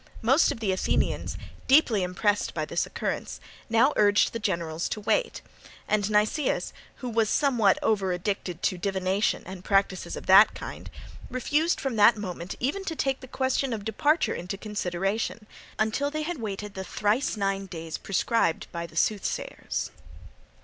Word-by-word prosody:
Most 265 +8 +4
of - - -5
the 205 -3 +1
Athenians, 185 - 0 0.3
deeply 260 -7 +5
impressed 200 +3 0
by - - -1
this - - -1
occurrence, - - -4 0.3
now 235 +6 +4
urged 205 -1 +4
the 230 - -3
generals 170 -5 -2
to - - -3
wait; 460 - 0 0.4
and 210 -1 +1
Nicias, 215 +7 +1 0.3
who - - -2
was 225 -1 +2
somewhat 240 -9 +3
over 195 -4 +1
addicted 180 -1 -3
to 185 - 0
divination 190 +2 0
and 185 -1 -8
practices 195 -3 +1
of - - -8
that 195 +3 +7
kind, - - -8 0.4
refused 295 +6 +1
from 265 -5 -2
that 215 +2 +6
moment 180 -3 -5
even 290 +11 -1
to 325 - -3
take 270 -3 0
the 260 - -11
question 260 0 0
of 210 -3 -5
departure 295 +9 +2
into 180 +3 -5
consideration, 205 +1 -2 0.3
until 220 +7 0
they 310 +1 -3
had 340 -1 -4
waited 210 -1 -5
the 190 - -5
thrice 210 +6 0
nine 195 -1 -1
days 165 -2 -6
prescribed 195 -2 0
by 170 0 -4
the 160 - -13
soothsayers. 205 +2 -1
210 Hz, 155 wpm, -27 LUFS, 190-245 Hz, 0.4 s, that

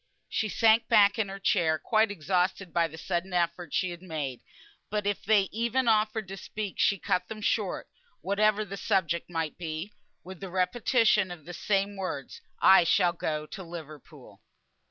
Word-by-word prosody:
She 215 - -1
sank 225 +2 +4
back 205 +1 +5
in 205 -3 0
her 195 - -6
chair, 170 -5 +2
quite 220 +6 +2
exhausted 185 0 -1
by 170 -1 +2
the 160 - -11
sudden 175 +2 -3
effort 170 -2 -1
she 185 -2 0
had 175 0 -9
made; 150 -8 -5 0.5
but 210 -1 -2
if 205 0 -1
they 210 -1 +4
even 235 +3 0
offered 215 -1 +2
to 195 - -6
speak, 210 0 -6
she 200 - +3
cut 180 0 -1
them 220 - -7
short 210 -2 -1 0.3
(whatever 210 +2 +2
the 195 0 -7
subject 170 -4 0
might 165 -2 -3
be), 165 +4 -5 0.3
with 185 0 -10
the 195 - -7
repetition 215 +2 +2
of 175 -4 -9
the 175 - -8
same 200 +3 -1
words, 185 -8 -5 0.2
"I 190 -2 +7
shall 175 +1 +3
go 155 -3 -3
to 190 - -9
Liverpool." 160 -4 -11
190 Hz, 175 wpm, -28 LUFS, 170-210 Hz, 0.5 s, I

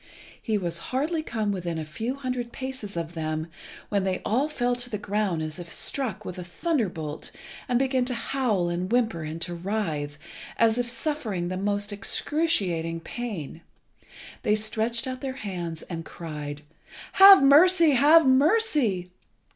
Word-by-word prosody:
He 220 -3 0
was 170 -3 -3
hardly 305 +5 0
come 220 -8 -2
within 175 -4 -3
a 160 - -4
few 225 - -4
hundred 250 -3 -4
paces 260 -8 -5
of 165 0 -4
them 155 -1 -3 0.4
when 200 -2 +1
they 190 -1 -1
all 265 +7 +1
fell 245 -4 0
to 245 0 -2
the 215 - -3
ground 200 -5 -1
as 155 +3 -5
if 170 -1 -8
struck 265 -6 -2
with 180 0 -6
a - - -5
thunderbolt, 175 - -2 0.4
and 245 - +3
began 260 -1 +1
to 250 -1 -2
howl 230 -8 0
and 175 +3 -2
whimper, 225 -8 +1
and 155 +1 -5
to 175 - -5
writhe, 170 -6 -3 0.4
as 230 +1 +3
if 245 - 0
suffering 230 - -2
the 185 - -3
most 205 +2 -1
excruciating 190 - 0
pain. 185 - -6 0.8
They 210 - +2
stretched 220 +3 0
out 255 -1 -5
their 270 -2 -3
hands, 175 -8 -5
and 165 -2 -6
cried 150 -3 -7 0.5
"Have 390 -5 +9
mercy, 330 +4 +6
have 295 +5 +6
mercy! 265 - +2
210 Hz, 155 wpm, -26 LUFS, 175-260 Hz, 0.8 s, Have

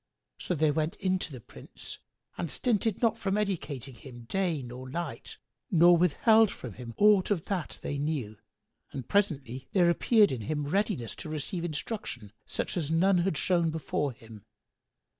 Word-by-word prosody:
So 180 - -2
they 155 0 +3
went 155 +5 -1
in 185 -2 0
to 165 - -4
the 130 - -8
Prince - - -8 0.4
and 170 - -3
stinted 225 - 0
not 230 0 +2
from 195 -1 0
educating 155 - -3
him 120 0 -12
day 170 +1 -1
nor 125 +1 -8
night, 170 +5 -5 0.3
nor 175 -3 +6
withheld 215 - +4
from 125 - -8
him 120 0 -9
aught 205 -2 +5
of 190 -6 0
that 185 -5 -3
they 145 - -3
knew; 135 -9 -3 0.5
and 130 -4 -6
presently 135 - 0
there 175 -3 +5
appeared 215 +3 +4
in 125 -4 -3
him 145 +7 -2
readiness 175 - -1
to - - -7
receive 155 +4 -4
instruction 150 - -4 0.2
such - - -2
as 155 -4 -1
none 180 +3 +3
had 175 -3 0
shown 170 -1 +2
before 150 -2 -2
him. 110 -3 -14
160 Hz, 165 wpm, -29 LUFS, 135-195 Hz, 0.5 s, nor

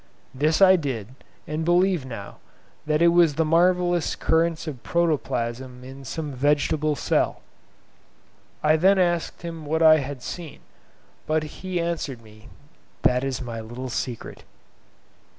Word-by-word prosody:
This 155 +7 +2
I 190 -1 +7
did, 125 - -4 0.4
and 155 +2 -3
believe 175 -3 +2
now 110 -6 -8 0.5
that 155 +2 +2
it 170 - +7
was 170 -4 +4
the 160 +1 +1
marvellous 175 +1 +2
currents 165 0 +1
of 140 -7 -6
protoplasm 130 -6 -2
in 135 +1 -11
some 155 +1 -4
vegetable 145 +3 +1
cell. - - 0 1.2
I 155 - +4
then 190 +4 +4
asked 175 -2 0
him 165 -2 -6
what 160 +2 0
I 155 -1 +8
had 140 -2 -5
seen; 170 -4 -7 0.7
but 155 0 +1
he 180 +4 -5
answered 160 -8 -3
me, 110 0 -16 0.5
"That 125 +1 +3
is 135 -1 -3
my 115 -2 -5
little 120 +4 -7
secret." 120 -1 -5
155 Hz, 135 wpm, -24 LUFS, 130-170 Hz, 1.2 s, I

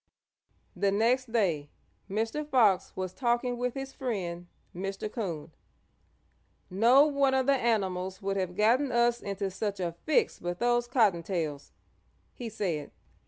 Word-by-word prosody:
The 195 +2 +1
next 235 +4 +1
day 170 -11 +1 0.4
Mr. 225 +9 -1
Fox 235 -10 +3
was 185 -1 -4
talking 240 +2 0
with 250 -1 -1
his 270 0 -5
friend, 180 -9 -4 0.3
Mr. 195 +3 -4
Coon. 170 -9 -4 1.2
"No 240 +9 +6
one 280 -2 +2
of 260 -1 +2
the 280 - +4
animals 190 -7 0
would 195 0 -2
have 185 -2 -2
gotten 245 +6 +3
us 240 0 +2
into 200 -1 -3
such 200 +1 -3
a 175 -2 -1 0.2
fix 440 +9 +2
but 175 0 -4
those 240 +1 +1
Cottontails," 175 - 0 0.6
he 240 -2 -6
said. 175 -9 -3
210 Hz, 135 wpm, -29 LUFS, 185-245 Hz, 1.2 s, No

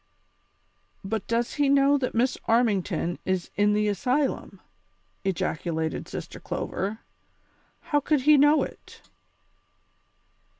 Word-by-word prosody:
"But 205 +1 -3
does 230 +1 0
he 290 -2 +1
know 280 +1 +4
that 255 -3 -3
Miss 250 +3 +2
Armington 200 -7 +1
is 185 -2 -2
in 205 0 +3
the 210 0 +1
asylum?" 255 +8 -1 0.6
ejaculated 160 -4 -2
Sister - - -7
Clover. 205 +4 -4 0.8
"How 295 - +1
could 290 0 +1
he 300 +3 +6
know 290 +2 +5
it - - -11
225 Hz, 110 wpm, -26 LUFS, 195-275 Hz, 0.8 s, he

